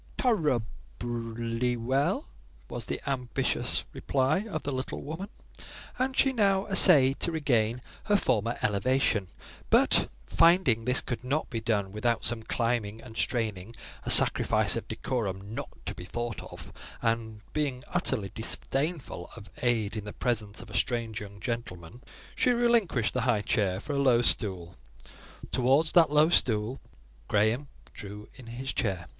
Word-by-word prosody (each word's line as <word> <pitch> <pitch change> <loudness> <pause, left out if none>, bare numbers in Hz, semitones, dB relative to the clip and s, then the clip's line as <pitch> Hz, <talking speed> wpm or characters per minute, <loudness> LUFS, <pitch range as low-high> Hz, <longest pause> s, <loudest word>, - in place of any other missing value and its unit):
"Tor 250 -4 +3
rer 150 - +1 0.4
ably 115 +1 -2
well," 140 - 0 0.4
was - - -4
the - - -3
ambitious 125 -1 -1
reply 140 +10 0
of 155 -6 -4
the 145 - -3
little 130 0 -4
woman 165 +7 -6 0.7
and 260 +1 -1
she 270 - +4
now 200 -4 +2
essayed 145 -8 +6
to 170 - -1
regain 125 -6 0 0.2
her 205 -1 +3
former 115 - 0
elevation, 105 -1 +1 0.4
but - - +3 0.2
finding 165 - +3
this 125 +1 +4
could 120 -1 -5
not 140 +5 -2
be 115 -2 -3
done 105 -4 -1
without 115 +3 -1
some 120 -1 -1
climbing 115 -2 -2
and 115 -1 -12
straining—a 110 -3 -4
sacrifice - - +6
of - - -5
decorum 100 -4 -4
not - - -5 0.2
to - - -3
be 90 - -10
thought 120 +1 -5
of—and 115 -2 -5
being 140 -4 -2
utterly 115 - 0
disdainful 135 - -2
of 100 -6 -12
aid 115 -4 0
in 105 -2 -5
the 105 - -7
presence 110 -4 -2
of - - -14
a - - -7
strange 115 -2 -1
young 100 0 -10
gentleman, 115 -4 -6 0.3
she - - +2
relinquished 235 - +2
the 125 - -1
high 115 -4 +1
chair 95 -5 0
for 145 +7 -5
a 140 - 0
low 125 -3 +3
stool: 95 -7 +1 0.8
towards 135 +5 +2
that 165 -3 +5
low 150 +2 +4
stool 115 -5 +1 0.5
Graham 110 +7 +1 0.3
drew 105 +1 -9
in 125 - -14
his 125 +3 -5
chair. 95 -6 -2
120 Hz, 150 wpm, -28 LUFS, 110-140 Hz, 0.8 s, essayed